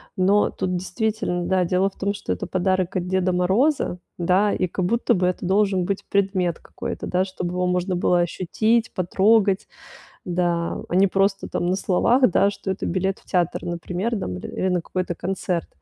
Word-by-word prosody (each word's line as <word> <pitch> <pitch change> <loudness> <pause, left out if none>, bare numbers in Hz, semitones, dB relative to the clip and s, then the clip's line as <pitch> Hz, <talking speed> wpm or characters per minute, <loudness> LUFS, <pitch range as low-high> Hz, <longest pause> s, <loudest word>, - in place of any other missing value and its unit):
Но 200 +1 +3
тут 185 -1 -2
действительно, 200 -2 -2
да, 185 -1 +2
дело 185 +3 +2
в 195 - -26
том, 200 +1 0
что 195 - -5
это 90 - -3
подарок 185 0 0
от 180 -1 -1
Деда 185 0 +1
Мороза, 190 - +1 0.2
да. 185 +4 +2
И 185 - 0
как 180 +1 -2
будто 235 +5 +2
бы 180 -1 +1
это 180 0 -2
должен 195 0 +2
быть 195 +2 -3
предмет 190 -4 +1
какой-то, - - -6
да, 185 +1 +1
чтобы 180 -2 -5
его 180 0 0
можно 180 0 0
было 175 0 +2
ощутить, 215 +6 0
потрогать. 195 +2 +2 0.6
Да, 175 -1 0
а - - -3
не 195 +2 +5
просто 195 +1 +1
там 175 - -2
на 180 - +1
словах, 230 +6 +3
да, 200 +3 +3
что 200 -1 -6
это 190 - -3
билет 190 +2 -1
в - - -24
театр, 175 -2 -1
например, 180 +6 -3
там 90 - -4
или 185 - -3
на 180 -1 +1
какой-то 180 0 -3
концерт. 180 -2 -2
185 Hz, 185 wpm, -23 LUFS, 180-195 Hz, 0.6 s, не